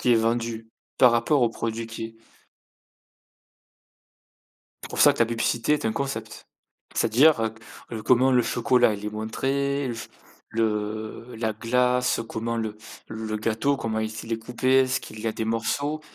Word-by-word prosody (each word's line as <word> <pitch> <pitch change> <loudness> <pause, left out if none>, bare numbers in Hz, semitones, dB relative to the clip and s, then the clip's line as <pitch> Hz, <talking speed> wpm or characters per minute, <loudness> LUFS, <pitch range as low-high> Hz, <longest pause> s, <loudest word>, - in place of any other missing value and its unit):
qui 125 - +3
est - - +6
vendue 115 0 0 0.3
par 125 -2 +7
rapport 120 +4 +2
au 120 - +4
produits 115 0 -3
qui 115 0 -7 2.7
c'est - - -8
pour - - -5
ça - - +7
que - - -9
la 115 - +5
publicité 115 +3 0
est 150 -4 -1
un 110 - +2
concept. 140 0 -4 0.5
C'est-à-dire, 130 +6 +5 0.5
heu, 110 - -4
comment 130 +1 +4
le 125 -1 +5
chocolat, 120 -1 +3
il 105 0 -6
est 105 - -1
montré? 135 +6 -1 0.6
Le 110 +1 -2
la 110 -1 -1
glace, 125 +2 +1
comment 115 +1 -2
le 110 -2 -3 0.3
le 110 -1 -4
gâteau, 115 +6 0
comment 115 -4 -3
est-il 110 +1 -5
est 115 - +1
coupé, 130 +3 +2
est-ce 130 0 0
qu'il 110 - -10
y 110 - -6
a - - +1
des 110 - -3
morceaux? 140 +7 -1
115 Hz, 155 wpm, -25 LUFS, 110-125 Hz, 2.7 s, par